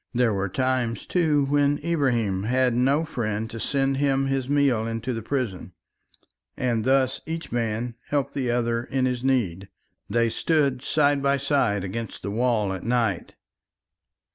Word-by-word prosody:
There 120 -2 +3
were 100 0 -1
times, 130 +1 -1
too, 155 -5 +2
when 145 +1 +2
Ibrahim 120 - +1
had 125 +3 +2
no 135 +6 +2
friend 110 -7 -2
to 115 - -6
send 135 +2 0
him 135 -1 +2
his 135 -1 -1
meal 140 -6 +2
into 115 +2 -3
the 115 - -4
prison. 110 -8 -3 0.8
And 120 -3 0
thus 130 -1 +2
each 165 +1 -5
man 115 0 -2
helped 140 -1 -1
the 130 -3 -1
other 120 -1 0
in 130 +1 -1
his 125 -1 -1
need. 100 -9 0 0.4
They 115 +2 +2
stood 140 -5 +1
side 145 -1 +2
by 140 0 +2
side 135 -8 +1
against 110 +4 -5
the 100 - -3
wall 110 -3 +1
at 95 - -5
night. 115 -6 -1
125 Hz, 155 wpm, -25 LUFS, 115-140 Hz, 0.8 s, There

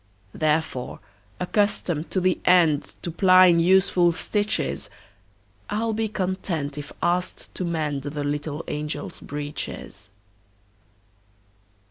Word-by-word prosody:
Therefore, 155 -5 -1 0.4
accustomed 180 -4 0
to 190 - +1
the 185 0 +1
endTo 170 -1 +2
plying 185 -2 +6
useful 180 0 +4
stitches,I 100 - -4
'll 225 -1 0
be 220 +1 0
content 185 -7 -2
if 145 -1 -7
asked 180 +1 -1
to - - -4
mendThe 150 -3 -2
little 145 +2 -3
angels' 150 +5 -4
breeches. 145 -8 -6
165 Hz, 90 wpm, -24 LUFS, 145-185 Hz, 0.4 s, plying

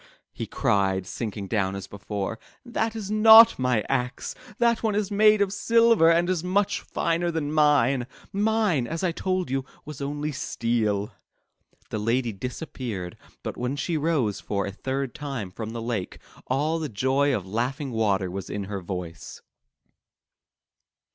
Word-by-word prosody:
'' - - -52
he - - -5
cried, 95 -2 +1
sinking 105 0 -5
down 95 -2 0
as 100 -1 -6
before, 100 +2 -5 0.3
'That 225 -2 -2
is 210 -2 -5
not 220 0 +8
my 125 -4 +1
axe. 125 -1 -2 0.2
That 235 -2 +2
one 220 -2 0
is 210 -1 -1
made 210 0 +5
of 195 -1 -3
silver 230 -5 +4
and 170 +1 +3
is 180 -3 0
much 190 +2 +1
finer 170 +1 -1
than 155 -3 -2
mine. 140 -5 +3 0.3
Mine, 205 - +1
as 165 +6 -4
I 180 - +2
told 185 -2 -2
you, 135 0 0 0.2
was 150 -1 -8
only 145 +2 -2
steel.'* 115 -7 -1 0.8
The 110 - -2
lady 115 +2 0
disappeared, 115 - -5 0.3
but - - -5
when 125 +3 -2
she 165 +4 -2
rose 150 -9 0
for 100 -1 -2
a 100 - -4
third 130 +4 -3
time 135 -10 -5
from 110 +3 -6
the 115 0 -5
lake, 115 -6 -3 0.3
all 150 +5 0
the 155 -2 -3
joy 130 +6 +1
of 95 - -4
laughing 125 +7 -2
water 100 -5 +1
was 95 0 -6
in 105 - -3
her 100 0 -5
voice. 90 -2 -7
135 Hz, 160 wpm, -25 LUFS, 105-170 Hz, 0.8 s, not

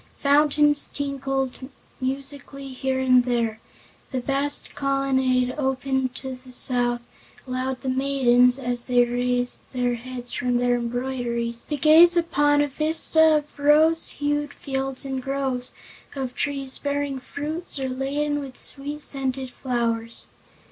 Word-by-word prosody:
Fountains 295 0 +4
tinkled 270 -2 -3 0.3
musically 275 +1 -5
here 260 0 -2
and 255 -1 +4
there; 235 -3 -1 0.5
the 260 - -2
vast 275 +3 -1
colonnade, 265 -2 +1
open 265 -1 0
to 260 +1 -7
the 255 - -13
south, 245 -1 -1 0.5
allowed 255 0 -3
the 270 - -6
maidens, 255 -2 +3
as 245 -2 -2
they 245 -1 +4
raised 245 0 -1
their 245 -1 0
heads 245 0 -6
from 245 0 0
their 245 0 +2
embroideries, 240 -1 -3
to 295 - -1
gaze 325 +4 +7
upon 290 -3 +3
a - - 0
vista 315 +2 +4
of 295 0 -7
rose 310 +3 +4
hued 290 0 -2
fields 270 0 -4
and 265 -1 -3
groves 265 -2 -1 0.4
of 260 -2 -4
trees 275 -2 -2
bearing 285 -1 -2
fruits 300 +6 -5
or 265 -1 -2
laden 285 +3 -1
with 270 -3 -9
sweet 290 +2 -1
scented 265 -2 -2
flowers. 230 -3 -2
265 Hz, 130 wpm, -24 LUFS, 250-285 Hz, 0.5 s, gaze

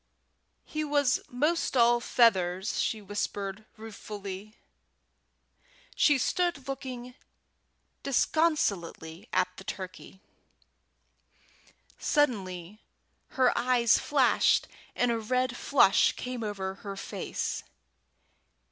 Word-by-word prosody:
"He 310 0 -3
was 285 -3 +2
'most 295 +3 0
all 240 0 +5
feathers," 190 -5 +2
she 215 -2 -2
whispered, 205 0 -4
ruefully. 210 -1 -8 1.4
She 295 -2 +4
stood 340 -1 -1
looking 255 -2 -6 0.9
disconsolately 215 - 0
at 180 - +1
the - - -9
turkey. 190 0 -8 1.8
Suddenly 200 - -1 0.6
her 255 -1 +4
eyes 240 -1 +3
flashed 275 -4 +3 0.3
and 245 -1 +2
a 230 - 0
red 255 +3 0
flush 245 -7 +4
came 250 -1 -5
over 195 -3 -3
her 200 -1 -6
face. - - -4
235 Hz, 85 wpm, -29 LUFS, 195-260 Hz, 1.8 s, all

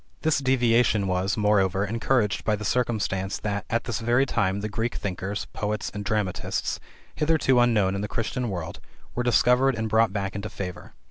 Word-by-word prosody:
This 160 -2 +2
deviation 120 -5 +3
was, 95 +2 0
moreover, 100 -2 +2
encouraged 115 0 0
by 110 - +1
the 105 +1 -6
circumstance 100 -5 0
that, 105 -1 -3
at 115 0 0
this 115 -4 -3
very 120 +4 +2
time, 100 -6 0
the 105 - -2
Greek 115 +3 -2
thinkers, 95 +1 -3
poets, 105 0 -2
and 105 0 -5
dramatists, 100 -2 -2 0.3
hitherto 150 -5 +2
unknown 110 -6 +3
in 100 - -2
the 105 - -2
Christian 120 +3 -2
world, 85 -4 -5 0.3
were 125 - -1
discovered 125 +2 +3
and 110 0 -2
brought 110 0 +3
back 100 -1 -3
into 100 +2 -5
favor. 90 -3 -7
105 Hz, 175 wpm, -25 LUFS, 100-120 Hz, 0.3 s, deviation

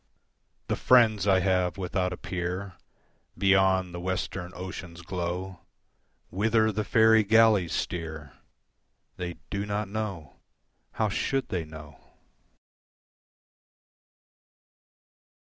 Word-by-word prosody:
L'Envoi - - -45
The - - +1
friends 110 -6 +4
I 95 -2 +5
have 90 -1 +1
without 90 0 -1
a 90 - -5
peer 90 +2 -4 0.6
Beyond 95 -2 +3
the 90 - -5
western 90 0 -3
ocean's 90 -2 -8
glow, 90 +1 -4 0.7
Whither 110 +3 +2
the 110 +1 -2
faerie 110 -1 +5
galleys 105 -4 +4
steer, 80 -5 -4 0.8
They 90 -1 -4 0.2
do 100 0 -2
not 105 0 -2
know: 100 -9 -5 0.6
how 110 -1 0
should 135 +6 -1
they 85 -3 -2
know? 75 -3 -12
95 Hz, 100 wpm, -27 LUFS, 90-105 Hz, 0.8 s, I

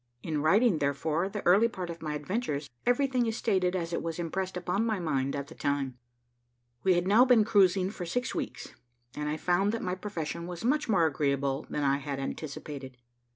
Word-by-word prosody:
In 155 -3 -1
writing, 195 +3 +4
therefore, 150 +5 0
the 210 0 -6
early 195 +6 +6
part 185 -6 -5
of 170 - -9
my 155 -2 -3
adventures, 150 -2 -2 0.2
everything 250 -1 +2
is 225 0 -2
stated 190 -4 +1
as 170 -2 -2
it - - -1
was 165 -1 -4
impressed 180 +2 -3
on 195 +5 +1
my 220 -2 0
mind 140 -5 -1
at 140 -1 -3
the - - -12
time. 140 -3 -2 0.8
We 185 -2 +4
had 175 +1 0
now 215 +5 +7
been 250 -4 +5
cruising 195 -3 +3
for 190 - -6
six 245 +9 -1
weeks, - - -5 0.4
and 150 0 -2
I 155 - -1
found 180 +5 +2
that 230 - -3
my 180 - -1
profession 170 -3 -4
was 180 +4 -6
much 295 +1 +1
more 185 -6 +4
agreeable 140 -1 0
than 150 - -2
I 140 0 +3
had 140 -1 -4
anticipated. 140 -2 -6
175 Hz, 200 wpm, -29 LUFS, 150-205 Hz, 0.8 s, now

